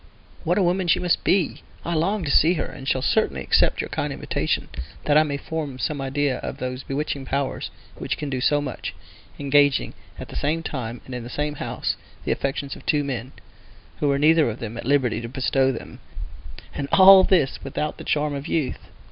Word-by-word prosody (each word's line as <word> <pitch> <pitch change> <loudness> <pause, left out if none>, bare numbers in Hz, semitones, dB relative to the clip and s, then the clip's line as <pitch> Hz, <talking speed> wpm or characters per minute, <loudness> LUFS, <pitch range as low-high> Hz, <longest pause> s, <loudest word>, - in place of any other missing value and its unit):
What - - +1
a 200 - +3
woman 180 +1 +1
she - - +4
must 180 -1 +1
be! 185 -4 +1 0.2
I 170 - -1
long 190 +5 0
to 145 - 0
see 165 +5 +5
her, 155 - -1
and 135 - -9
shall 130 -1 +1
certainly - - +1
accept - - +3
your - - -6
kind - - -2
invitation, - - -2 0.4
that 145 - +3
I 155 - +8
may 145 -2 -1
form 150 -2 -4
some 145 +2 -2
idea 135 -1 0
of - - -5
those 125 0 -4
bewitching 140 0 -3
powers 140 +1 -2 0.3
which - - -3
can 150 - -4
do 130 -2 -2
so 145 +2 +3
much—engaging 145 0 -1 0.2
at - - -8
the - - -9
same 160 +3 -1
time, 120 -6 -5
and 130 - -9
in 125 - -4
the 120 - -8
same 150 +3 -2
house, - - -3 0.3
the - - 0
affections 140 0 -2
of - - -13
two 150 -2 +2
men, 130 -2 -4 0.7
who 145 - +1
were 140 -1 +2
neither 155 -1 +4
of 110 - -5
them 115 -1 -6
at 115 - -6
liberty 130 -5 +2
to 115 - -6
bestow 130 +1 +1
them—and 125 - -9
all 190 0 +9
this 170 -9 +2
without 150 +2 -3
the - - -7
charm 150 0 0
of 140 +2 -5
youth! 155 -7 -1
140 Hz, 200 wpm, -24 LUFS, 130-155 Hz, 0.7 s, all